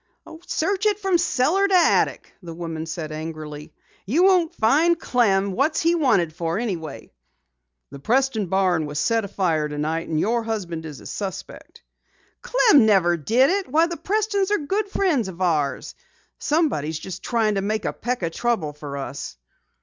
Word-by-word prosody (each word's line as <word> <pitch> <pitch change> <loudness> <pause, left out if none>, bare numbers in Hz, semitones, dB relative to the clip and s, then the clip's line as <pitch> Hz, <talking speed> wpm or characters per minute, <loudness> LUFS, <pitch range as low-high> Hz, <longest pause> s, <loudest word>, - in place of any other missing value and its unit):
"Search 390 +5 0
it 415 -2 +1
from 385 -4 +1
cellar 350 +5 +2
to 390 - +2
attic!" 350 -2 +2
the 170 -3 -9
woman 165 -1 -5
said 155 -1 -5
angrily. 155 -1 -7 0.4
"You 305 - +2
won't 365 -4 +3
find 315 +10 +3
Clem! 200 -8 +1
What's 280 - +1
he 335 +1 +2
wanted 200 - +2
for 165 +1 -2
anyway?" 175 - -5 0.8
"The 140 - -9
Preston 235 - +1
barn 180 -4 +1
was 145 0 -6
set 225 +7 +1
afire 170 -6 0
tonight, 155 +3 -3
and 155 -1 -1
your 230 +6 +1
husband 180 -8 -4
is 150 -3 -10
a - - -14
suspect." 195 -2 -7 0.6
"Clem 370 - +4
never 180 -5 +4
did 235 - +2
it! 395 0 -1
Why, 315 +5 +3
the 340 0 -4
Prestons 400 +3 0
are 415 - +2
good 390 +8 -2
friends 330 - +1
of 185 -2 -9
ours! 155 -6 -1 0.5
Somebody's 280 - 0
just 185 +4 -8
tryin' 225 -3 0
to 195 - -1
make 215 +2 -2
a - - -1
peck 245 -4 -3
o' 170 - 0
trouble 190 -6 -1
for 145 -1 -7
us." 135 - -6
210 Hz, 165 wpm, -23 LUFS, -, 0.8 s, Clem